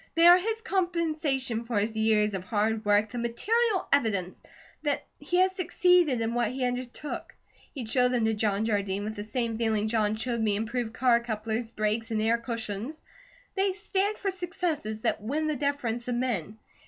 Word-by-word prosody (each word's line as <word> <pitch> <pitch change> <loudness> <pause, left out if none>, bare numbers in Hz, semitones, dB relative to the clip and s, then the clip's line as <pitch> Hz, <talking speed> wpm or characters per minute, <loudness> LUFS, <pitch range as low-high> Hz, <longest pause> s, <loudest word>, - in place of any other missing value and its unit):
They 330 0 +5
are 350 +1 +9
his 445 +3 -2
compensation 315 - 0
for 235 -2 -2
his 215 +2 0
years 215 -1 +2
of 190 -2 -3
hard 220 +1 0
work, 205 +1 +3
the 245 - -4
material 410 - +1
evidence 200 -9 +1 0.4
that 290 -2 -1
he 325 +5 -1
has 370 +1 +4
succeeded 360 -7 +3
in 225 +1 -1
what 240 -2 +1
he 255 +1 -2
undertook. 250 +3 -5 0.4
He'd 250 -5 -5
show 250 +2 +3
them 245 -3 +1
to 220 - +2
John 210 -1 0
Jardine 200 -2 -1
with 215 +1 -4
the 205 - -5
same 230 +1 -2
feeling 220 -2 +1
John 215 -1 +1
showed 235 +1 -1
me 210 -2 +2
improved 225 +2 -2
car 245 -2 +4
couplers, 225 0 -3
brakes, 215 +1 -1
and 220 -1 0
air 225 +2 +2
cushions. 230 +3 -5 0.5
They 385 0 +1
stand 400 +1 -1
for 390 - -1
successes 350 - -3
that 230 - 0
win 290 +9 -1
the 305 -1 0
deference 250 -4 -2
of 245 - -1
men. 220 -5 -2
235 Hz, 180 wpm, -28 LUFS, 220-305 Hz, 0.5 s, are